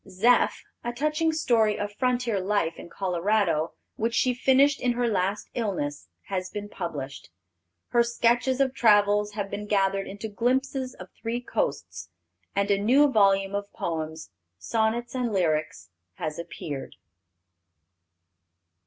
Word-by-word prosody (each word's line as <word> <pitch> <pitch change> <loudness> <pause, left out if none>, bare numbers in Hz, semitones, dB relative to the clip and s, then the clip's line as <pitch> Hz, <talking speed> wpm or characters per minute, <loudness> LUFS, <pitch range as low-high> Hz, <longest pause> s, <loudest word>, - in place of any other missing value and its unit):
Zeph, 220 +7 +3 0.2
a 240 - -2
touching 305 +5 0
story 230 -9 +2
of 205 0 -4
frontier 245 -3 0
life 185 -4 0
in - - -10
Colorado, 180 -3 0 0.2
which 230 +1 -1
she 250 +1 +3
finished 270 +3 +3
in 250 -1 +2
her 245 0 0
last 200 -1 -1
illness, 175 -11 -3 0.2
has 185 -1 -3
been 205 0 -6
published. 140 - -6 0.6
Her 240 - +4
sketches 240 +2 +2
of 265 -1 +2
travel 205 -3 +4
have 205 -2 -4
been 210 +1 -5
gathered 195 -1 +1
into 205 +3 -6
Glimpses 255 +4 -1
of 185 0 -11
Three 235 +1 -2
Coasts, 370 - -3 0.5
and 200 +1 +1
a 200 0 +2
new 270 +7 +5
volume 195 -3 +3
of 200 0 -3
poems, 160 -5 -4 0.3
Sonnets 225 - -1
and 250 -3 -1
Lyrics, 155 - -1 0.2
has 155 - -4
appeared. 155 -4 -6
210 Hz, 135 wpm, -26 LUFS, 185-240 Hz, 0.6 s, new